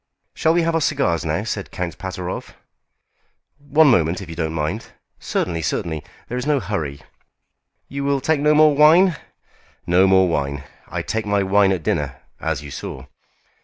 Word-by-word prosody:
"Shall 160 +1 +2
we 175 - +3
have 165 0 0
our 165 - +1
cigars 135 - +1
now?" 80 +5 -1
said 105 -2 -4
Count 90 -2 -5
Pateroff. 90 -1 -6 1.0
"One 145 +2 +3
moment, 85 -5 +2
if 95 -4 -8
you - - -7
don't 80 -1 -2
mind." 75 -1 -3 0.3
"Certainly, 85 -2 -2
certainly. 80 +1 -2 0.2
There 125 - -3
is 125 - -4
no 150 -2 +3
hurry." 75 - -4 0.8
"You 140 +1 -5
will 140 0 +1
take 155 +3 +1
no 150 +1 +3
more 155 -1 +6
wine?" 165 +4 +6 0.7
"No 90 +2 +4
more 95 -1 +5
wine. 70 -3 -2 0.2
I - - -4
take 110 -1 -3
my 100 -1 +2
wine 95 0 +3
at 90 -4 -2
dinner, 75 -4 -2 0.2
as - - -2
you 75 - -9
saw." 65 -1 -7
95 Hz, 170 wpm, -21 LUFS, -, 1.0 s, more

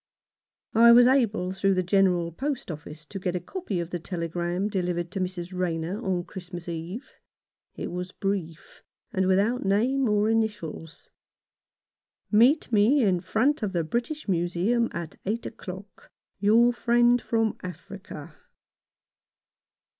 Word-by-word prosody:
I 235 +1 +7
was 240 +1 +8
able 225 -8 +2
through 195 0 +1
the 185 - +1
General 180 -2 +2
Post 270 - -3
Office 150 0 -9
to 195 - -7
get 180 -1 -2
a - - 0
copy 205 - -4
of 170 0 -4
the 175 - -3
telegram 175 +2 -2
delivered 175 -4 -2
to 195 - -4
Mrs. 180 -1 -4
Rayner 180 +3 -2
on 180 -2 -1
Christmas 175 -1 -9
Eve. 170 - -6 0.6
It - - -5
was 180 +1 -5
brief, 185 -6 -4 0.3
and 190 0 +1
without 205 +7 +2
name 235 +6 +2
or 210 0 +2
initials: 210 -8 -3 0.6
— - - -54
"Meet 245 +7 +4
me 230 +6 +4
in 185 -4 +2
front 225 - +1
of 205 -3 -2
the 170 -2 0
British 240 - -3
Museum 185 +6 +1
at 170 -2 -6
eight 225 +3 -2
o'clock. 190 -2 -9 0.2
— - - -57
Your 230 +4 +5
friend 240 0 +3
from 225 -1 0
Africa." 180 -3 -9
195 Hz, 140 wpm, -26 LUFS, 175-225 Hz, 0.6 s, was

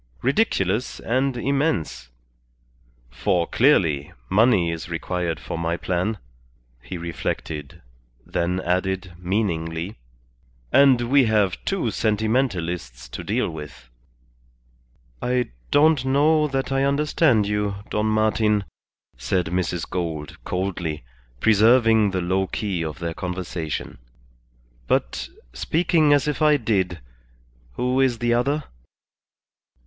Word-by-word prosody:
Ridiculous 125 - +1
and 130 +2 0
immense; 135 - -1 1.0
for, 85 +7 +1
clearly, 85 - +2 0.2
money 95 -4 +4
is 80 0 -6
required 85 0 -2
for 85 - -5
my 85 +1 -1
plan," 95 +5 -1 0.6
he - - -7
reflected; 80 -4 -5 0.4
then 90 +2 -1
added, 95 +1 -1
meaningly, 90 -1 -2 0.7
"and 135 -3 +6
we 130 +3 +4
have 105 -4 +1
two 185 - 0
sentimentalists 100 - -1
to - - -7
deal - - 0
with." 75 -6 -9 1.3
"I 125 0 0 0.2
don't 150 -2 +4
know 150 +3 +3
that 135 -1 -2
I 135 0 +2
understand 140 -4 +2
you, 105 -1 -1 0.2
Don 105 +1 0
Martin," 110 -1 +2 0.6
said 90 -2 0
Mrs. 90 -1 -1
Gould, 80 -5 -4
coldly, 90 -6 -3 0.4
preserving 110 - +5
the 95 -1 -2
low 95 +2 0
key 95 -5 -2
of 80 -1 -5
their 85 -1 -4
conversation. 90 -3 -5 0.9
"But, - - -1 0.2
speaking 160 -2 +2
as 145 0 +3
if 150 +1 -2
I 150 -1 +5
did, 95 - -1 0.7
who 125 - 0
is 130 -3 +2
the 120 0 +1
other?" 140 +5 +1
100 Hz, 110 wpm, -23 LUFS, 85-125 Hz, 1.3 s, and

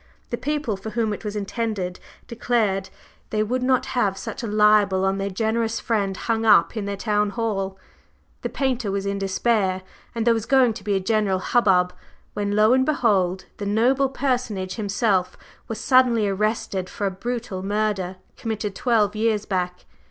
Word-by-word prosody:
The - - +1
people 290 -8 -2
for 195 +3 -7
whom 220 -1 -1
it 205 - -7
was 210 -1 -4
intended 200 -3 -3 0.3
declared 215 -5 0 0.4
they 215 0 +1
would 250 +4 -1
not 255 0 +2
have 205 -6 +1
such 195 - -6
a 230 - -4
libel 210 -2 +4
on 195 +1 0
their 195 0 -1
generous 225 +3 -1
friend 200 -4 -1
hung 225 -1 -1
up 220 +1 +5
in 215 -3 -3
their 200 0 -3
town 210 0 +1
hall. 200 -3 -2 0.6
The - - -3
painter 255 -5 -1
was 195 0 -2
in 200 0 -2
despair, 195 -1 0 0.3
and 230 -1 -1
there 235 - +5
was 225 -1 -3
going 260 -4 +4
to 200 - -10
be 205 -1 0
a - - +2
general 205 -1 +1
hubbub, 185 -4 +2 0.4
when, 205 0 -1
lo 215 +3 +5
and 260 0 +4
behold 200 -10 +1
the 205 - -4
'noble' 255 +6 +2
personage 245 -8 -2
himself 200 -3 0 0.3
was 225 - -5
suddenly 245 -5 +4
arrested 200 -2 -1
for 205 - -4
a 195 - 0
brutal 230 -1 -4
murder 200 -2 -1 0.2
committed 215 -3 -3
twelve 215 -3 +1
years 215 -1 +1
back. 180 -2 -3
210 Hz, 175 wpm, -23 LUFS, 195-230 Hz, 0.6 s, up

